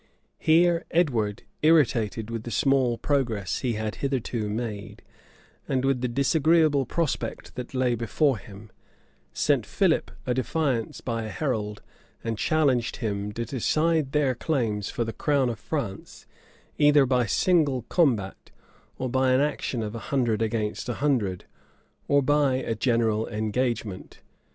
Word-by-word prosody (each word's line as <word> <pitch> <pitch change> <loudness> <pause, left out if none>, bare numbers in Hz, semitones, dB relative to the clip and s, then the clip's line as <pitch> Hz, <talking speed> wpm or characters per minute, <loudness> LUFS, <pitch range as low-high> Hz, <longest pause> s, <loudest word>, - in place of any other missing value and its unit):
Here 170 +1 +4
Edward, 120 - 0 0.2
irritated 120 -8 +2
with 115 -1 -3
the 120 - -7
small 130 -1 +2
progress 120 - -1
he 125 -3 -1
had 110 0 -3
hitherto 125 -5 -2
made, 105 -2 -5 0.6
and 130 -1 0
with 135 -2 +1
the 125 - 0
disagreeable 145 +2 +3
prospect 165 -4 -3
that 125 +1 -7
lay 130 -1 +2
before 115 +3 +1
him, 100 +1 -13 0.6
sent - - +1
Philip - - +1 0.2
a 125 - 0
defiance 130 -2 -1
by 115 -2 -3
a - - -5
herald 110 -7 -3 0.4
and 115 -1 -2
challenged 135 -2 +1
him 105 -3 -3
to 115 +2 -3
decide 155 +4 +1
their 145 -3 +2
claims 115 - -1
for 120 - -2
the 115 0 -4
crown 140 -4 +1
of 110 - -7
France - - -5 0.5
either 145 -1 +6
by 125 -2 +1
single 145 - +2
combat, 115 - 0 0.5
or 130 - -2
by 130 +1 +2
an 130 - +4
action 140 -5 -1
of 105 0 -5
a 115 - -5
hundred 120 -6 +1
against 110 0 -2
a 120 - -2
hundred, 115 -11 0 0.6
or 140 -1 +3
by 145 -1 +3
a 130 -3 -2
general 115 -1 +1
engagement. 110 -2 -3
125 Hz, 140 wpm, -26 LUFS, 110-140 Hz, 0.6 s, either